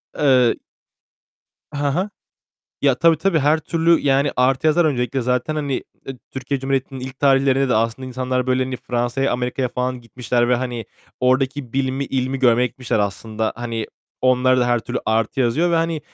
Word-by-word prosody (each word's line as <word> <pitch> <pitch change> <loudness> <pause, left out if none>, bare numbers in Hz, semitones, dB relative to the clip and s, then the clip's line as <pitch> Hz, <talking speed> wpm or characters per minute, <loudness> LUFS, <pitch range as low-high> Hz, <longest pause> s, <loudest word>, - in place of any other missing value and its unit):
Eee 130 -4 +4 1.2
Ha 145 -1 -1
ha. 190 +4 -1 0.7
Ya, 140 -2 +4
tabii, 165 +4 +4
tabii 190 -2 +2
her 150 +2 +3
türlü 165 +1 +2
yani 140 0 +2
artı 130 +3 +2
yazar 160 +2 +4
öncelikle 130 -2 0
zaten 125 +5 -1
hani, 140 -3 -2 0.3
ııı, 135 -2 -6
Türkiye 135 +1 -3
Cumhuriyeti'nin 135 -1 -2
ilk 130 +1 -8
tarihlerinde 135 -1 +3
de - - +2
aslında 115 +4 -1
insanlar 130 0 -2
böyle 130 0 +2
hani 130 0 -4
Fransa'ya, 120 +3 -1
Amerika'ya 125 +1 -1
falan 125 0 -3
gitmişler 120 0 -1
ve 125 - +4
hani 120 -3 -3 0.4
oradaki 130 0 0
bilimi, 135 0 -1
ilmi 130 0 -2
görmeye 125 -1 +4
gitmişler 125 -3 -3
aslında. 110 +2 -2
Hani 115 -2 -4 0.3
onlara 130 0 +3
da 120 - +2
her 120 0 +2
türlü 120 +2 -4
artı 115 +4 0
yazıyor 150 +9 +2
ve 170 - +2
hani 165 -1 0
130 Hz, 165 wpm, -20 LUFS, 125-140 Hz, 1.2 s, Eee